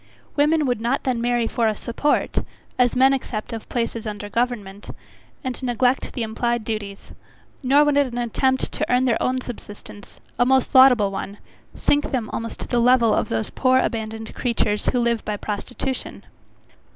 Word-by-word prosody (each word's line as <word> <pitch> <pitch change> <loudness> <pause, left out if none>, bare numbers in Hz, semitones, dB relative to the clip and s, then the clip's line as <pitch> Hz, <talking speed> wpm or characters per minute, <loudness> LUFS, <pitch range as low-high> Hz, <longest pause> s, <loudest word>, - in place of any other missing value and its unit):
Women 300 +1 +3
would 245 -4 -1
not 245 +4 0
then 250 -3 -1
marry 240 -1 +1
for 230 0 0
a 215 - 0
support, 240 +8 0 0.4
as 245 -1 +3
men 265 +2 +5
accept 240 -4 -4
of 225 - -7
places 230 -2 -2
under 205 -1 -5
government, 210 -4 -3 0.5
and 260 -1 -4
neglect 250 +1 0
the 240 - -2
implied 235 +1 -1
duties; 210 -3 -5 0.5
nor 280 +2 +5
would 295 -1 +2
an 265 -4 +1
attempt 260 +2 0
to - - -2
earn 250 +1 +3
their 240 -3 +1
own 255 0 0
subsistence, 205 -4 -10 0.2
a - - +6
most 265 +1 +2
laudable 250 -7 +6
one! 195 +1 -5 0.4
sink 290 0 +1
them 245 -6 -2
almost 230 0 -5
to - - -5
the 240 - +1
level 240 -2 +4
of - - 0
those 110 -1 -2
poor 255 -1 +3
abandoned 220 -2 -2
creatures 220 -4 -1
who 250 - +2
live 235 -1 0
by 210 -1 -3
prostitution. 245 +6 -5
240 Hz, 170 wpm, -22 LUFS, 220-260 Hz, 0.5 s, a